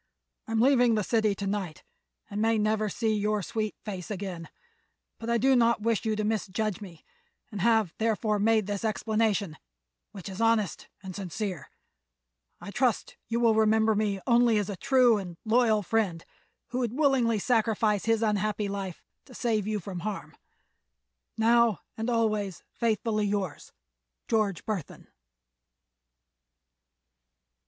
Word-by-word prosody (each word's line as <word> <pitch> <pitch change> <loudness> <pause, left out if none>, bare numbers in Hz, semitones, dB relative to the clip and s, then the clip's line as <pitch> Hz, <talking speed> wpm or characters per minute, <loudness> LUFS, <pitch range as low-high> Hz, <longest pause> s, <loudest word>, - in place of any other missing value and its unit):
I 225 - -4
am 225 - +2
leaving 245 -3 +4
the 210 - 0
city 215 -1 +1
to 200 - -5
night 195 -5 -3 0.4
and 205 +1 -4
may 225 0 +3
never 215 0 +1
see 220 +2 0
your 210 -1 0
sweet 215 +3 -3
face 190 -2 -6
again, 185 -5 -5 0.7
but 230 - -5
I 235 - +3
do 265 +3 +4
not 235 -2 +3
wish 230 -1 0
you 220 -1 +1
to 215 - -2
misjudge 215 -1 -2
me 175 -6 -11 0.5
and 205 -3 -5
have, 220 -5 +3
therefore, 220 -1 +1
made 220 0 +3
this 205 +1 -3
explanation, 215 -5 0 0.5
which 190 - -9
is 195 +2 -6
honest 225 -5 +1 0.2
and 185 -2 -7
sincere. 195 -2 -5 0.9
I 200 - -8
trust 245 0 0
you 230 +1 -1
will 230 -2 +4
remember 220 0 +3
me 205 -2 0
only 235 -2 +4
as 205 -1 -1
a - - -4
true 250 -1 +4
and 175 -3 -8
loyal 220 -2 +3
friend 195 -5 -1 0.4
who 250 +2 -2
would 245 0 -2
willingly 265 -7 +3
sacrifice 220 -2 +1
his 225 0 +2
unhappy 210 0 0
life 195 -3 -5 0.2
to 255 - -14
save 220 -4 0
you 215 -1 -1
from 185 -1 -6
harm. 205 +2 -5 1.0
Now 230 -1 +3
and 225 +2 -3
always 215 -5 0
faithfully 215 -2 0
yours_, 195 -6 -3 0.6
"GEORGE 210 -6 0
BURTHON." 205 -8 -5
215 Hz, 145 wpm, -28 LUFS, 200-230 Hz, 1.0 s, leaving